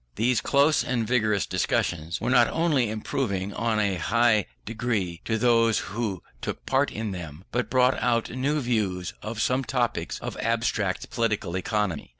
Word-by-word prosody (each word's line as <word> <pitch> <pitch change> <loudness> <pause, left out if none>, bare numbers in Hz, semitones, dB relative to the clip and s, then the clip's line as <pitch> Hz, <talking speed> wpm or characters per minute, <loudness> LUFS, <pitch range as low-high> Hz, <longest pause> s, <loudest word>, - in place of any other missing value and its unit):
These 120 +2 +2
close 145 +2 +3
and 120 -3 -1
vigorous 110 -4 +2
discussions 85 -2 -1
were 120 +3 -1
not 120 -2 +6
only 150 -8 +1
improving 105 -3 -2
in 110 0 0
a 100 -3 +1
high 110 +4 +2 0.2
degree 105 -7 -2
to 110 - 0
those 115 -1 +3 0.2
who 105 -5 -3 0.2
took - - -5
part 135 +2 +2
in 110 -1 -3
them, 85 -3 -7
but 125 +1 -1
brought 130 0 +3
out 115 -2 +1
new 140 +4 0
views 105 -8 -1
of 110 +1 -5
some 125 +4 +1
topics 125 -3 -1
of - - -6
abstract 110 -5 -1
Political 105 -6 -1
Economy. 95 -3 -1
115 Hz, 160 wpm, -26 LUFS, 100-125 Hz, 0.2 s, not